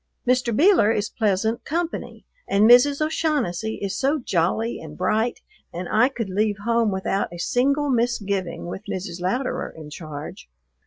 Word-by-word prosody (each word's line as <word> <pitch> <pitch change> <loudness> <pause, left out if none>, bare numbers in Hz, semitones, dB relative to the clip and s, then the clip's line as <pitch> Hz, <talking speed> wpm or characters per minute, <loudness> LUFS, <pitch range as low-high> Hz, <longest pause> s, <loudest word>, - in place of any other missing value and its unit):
Mr. 250 -1 +2
Beeler 305 - +5
is 210 -2 -1
pleasant 220 +1 0
company, 335 +2 -4 0.2
and 205 +2 +4
Mrs. 280 +5 +6
O'Shaughnessy 260 - -1
is 200 0 -2
so 275 +6 +1
jolly 220 - 0
and 150 -1 -10
bright, 215 +6 0 0.3
and 175 +1 -5
I 225 +4 +4
could 235 -6 -4
leave 210 +1 +1
home 230 -1 +2
without 190 0 -1
a 175 - -8
single 275 +9 +1
misgiving 205 -7 -1
with 175 +2 -6
Mrs. 180 -2 -5
Louderer 245 +9 -1
in 150 -2 -10
charge. 150 - -8
220 Hz, 150 wpm, -23 LUFS, 185-250 Hz, 0.3 s, Mrs